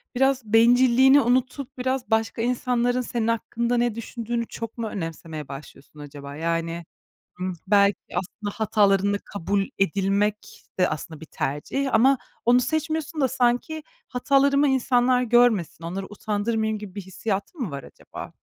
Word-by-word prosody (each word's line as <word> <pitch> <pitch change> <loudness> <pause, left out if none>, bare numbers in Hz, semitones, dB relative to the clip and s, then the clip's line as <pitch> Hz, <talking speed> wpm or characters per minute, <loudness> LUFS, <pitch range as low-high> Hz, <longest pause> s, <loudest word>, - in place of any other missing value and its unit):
biraz 270 +1 +2
bencilliğini 250 +4 +6
unutup 255 +2 -1
biraz 260 -1 -2
başka 225 +1 +1
insanların 245 0 +1
senin 235 -2 -2
hakkında 235 +1 0
ne 240 -2 +1
düşündüğünü 235 0 -4
çok 230 0 -7
mu 230 -1 -2
önemsemeye 165 -5 -6
başlıyorsun 140 +1 -11
acaba? 145 -1 -9
Yani, 165 +1 -2 0.6
ımm, 185 0 -2
belki 200 -1 +4 0.2
aslında 200 +3 -4
hatalarınla 200 -2 +2
kabul 200 +1 -1
edilmek 200 +3 0
de 180 - +4
aslında 155 0 -6
bir 160 - -10
tercih 235 - -2
ama 260 +4 +5 0.3
onu 245 +1 +5
seçmiyorsun 315 +3 -2
da 265 - +3
sanki 255 +5 0 0.3
hatalarımı 280 +3 +3
insanlar 250 -1 +3
görmesin, 225 - +2
onları 190 +3 -4
utandırmayayım 220 +1 -1
gibi 205 -3 -9
bir 205 - -4
hissiyatın 195 - -4
mı 220 - -2
var 140 -1 -6
acaba? - - -10
225 Hz, 135 wpm, -24 LUFS, 195-250 Hz, 0.6 s, bencilliğini